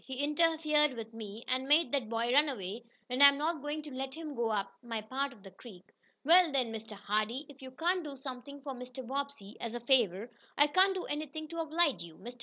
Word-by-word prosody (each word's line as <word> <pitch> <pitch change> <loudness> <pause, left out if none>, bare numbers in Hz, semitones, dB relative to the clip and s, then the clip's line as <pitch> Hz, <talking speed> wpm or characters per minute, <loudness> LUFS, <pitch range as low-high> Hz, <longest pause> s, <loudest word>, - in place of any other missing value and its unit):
He 265 - -7
interfered 305 -1 +3
with 225 -1 -7
me, 220 0 -8
and 260 +1 0
made 295 -2 +4
that 265 -6 -1
boy 230 +1 0
run 295 +2 +5
away, 220 -1 -5 0.2
and 255 +2 -1
I'm 280 0 +9
not 310 +1 -1
going 295 +1 -4
to 295 -3 -9
let 265 +1 -4
him 315 -2 -6
go 235 -3 0
up 200 -2 -1
my 230 -2 -4
part 265 +6 -2
of 220 -6 -16
the 195 - -11
creek." 190 -6 -13 0.4
"Well, 340 +1 +7
then, 255 -5 0
Mr. 225 0 -7
Hardee, 215 +6 -1
if 275 -1 -14
you 260 - -8
can't 345 +7 0
do 285 -3 -7
something 270 +1 -8
for 280 -2 -4
Mr. 250 0 -8
Bobbsey, 270 -5 -5
as 235 0 -4
a - - -2
favor, 235 -4 +2 0.3
I 290 - +7
can't 375 +6 +4
do 370 - -3
anything 305 +1 -4
to 335 - -7
oblige 320 - +1
you. 170 -2 -10
Mr. 240 +5 -10
265 Hz, 225 wpm, -32 LUFS, 230-295 Hz, 0.4 s, I'm